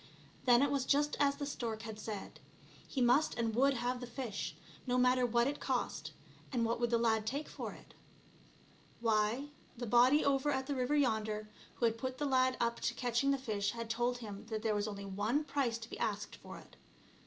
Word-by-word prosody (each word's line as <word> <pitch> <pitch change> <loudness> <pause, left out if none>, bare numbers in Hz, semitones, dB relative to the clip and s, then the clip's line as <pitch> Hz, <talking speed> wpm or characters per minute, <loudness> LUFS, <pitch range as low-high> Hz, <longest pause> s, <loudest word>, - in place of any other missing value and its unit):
Then 245 +1 +6
it 285 - +2
was 280 -2 +1
just 290 +2 +2
as 280 -1 +3
the 285 0 -4
stork 230 -5 -4
had 220 -1 -7
said. 210 -2 -6 0.5
He 265 - -2
must 250 +5 +4
and 230 -2 0
would 270 +4 +4
have 245 +1 -1
the 245 - -6
fish, 235 -5 -4 0.3
no 250 0 +2
matter 250 0 +4
what 235 0 +3
it 285 +2 -2
cost; - - -2 0.4
and 240 -4 +1
what 230 +1 0
would 240 -1 +1
the 235 - +3
lad 220 -2 +1
take 285 +6 -2
for - - -6
it? - - -16 1.1
Why, 225 +4 +1 0.3
the 240 - -4
body 245 +6 +5
over 280 +1 +2
at 265 -2 0
the 285 - -2
river 260 +2 0
yonder, 220 -6 0 0.3
who 240 - +1
had 230 0 +1
put 255 +1 -3
the 295 - -1
lad 260 -2 +3
up 235 0 0
to 240 - -1
catching 245 +2 +1
the 275 - +3
fish, 210 -5 -1
had 230 -1 -4
told 240 +2 0
him 215 -2 -8
that 220 -1 -4
there 220 -2 +2
was 205 0 0
only 200 -1 -5
one 210 +9 0
price 275 -5 0
to 225 -1 -9
be - - -6
asked 210 -1 -2
for - - -10
it. - - -16
240 Hz, 210 wpm, -34 LUFS, 220-270 Hz, 1.1 s, Then